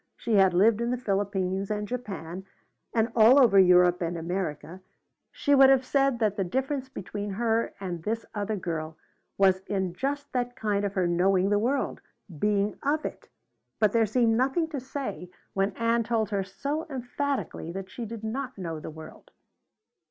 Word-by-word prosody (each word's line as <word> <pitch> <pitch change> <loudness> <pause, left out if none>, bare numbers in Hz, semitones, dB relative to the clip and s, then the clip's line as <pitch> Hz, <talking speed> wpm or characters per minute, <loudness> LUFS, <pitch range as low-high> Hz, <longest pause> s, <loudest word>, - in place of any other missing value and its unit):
She 220 -3 0
had 190 -2 +5
lived 215 +4 +4
in 235 - 0
the 250 - 0
Philippines 195 -3 -1
and 210 -1 -2
Japan 190 -7 -6 0.5
and 225 0 +1
all 235 +4 +7
over 220 -7 +6
Europe 180 -1 +5
and 170 0 -2
America. 175 0 -4 0.5
She 285 - 0
would 270 -1 +8
have 265 -1 +4
said 275 -2 +2
that 215 -3 0
the 195 - +1
difference 265 +7 -2
between 205 -3 -6
her 230 +2 0
and 180 -4 -5
this 225 +6 -3
other 210 +1 -2
girl 160 -4 -4 0.4
was 190 -1 +4
in 190 -3 -1
just 285 +7 -3
that 245 0 -2
thing 205 -2 0
of 200 0 -2
her 185 -2 +2
knowing 185 +3 +2
the 205 - +3
world 255 +6 -1 0.4
being 205 +1 0
of 300 +2 0
it. - - -7 0.5
But 215 -2 +4
there 225 -1 +3
seemed 225 +1 +2
nothing 270 +7 +1
to 295 -4 -4
say 255 -8 -6 0.2
when 195 0 +1
Ann 230 0 +1
told 225 -2 -1
her 200 -1 0
so 280 +12 -4
emphatically 265 - -3
that 190 +1 -7
she 240 - -6
did 225 0 -8
not 255 +3 -4
know 165 -4 -5
the - - -7
world. 155 0 -12
210 Hz, 175 wpm, -27 LUFS, 190-250 Hz, 0.5 s, would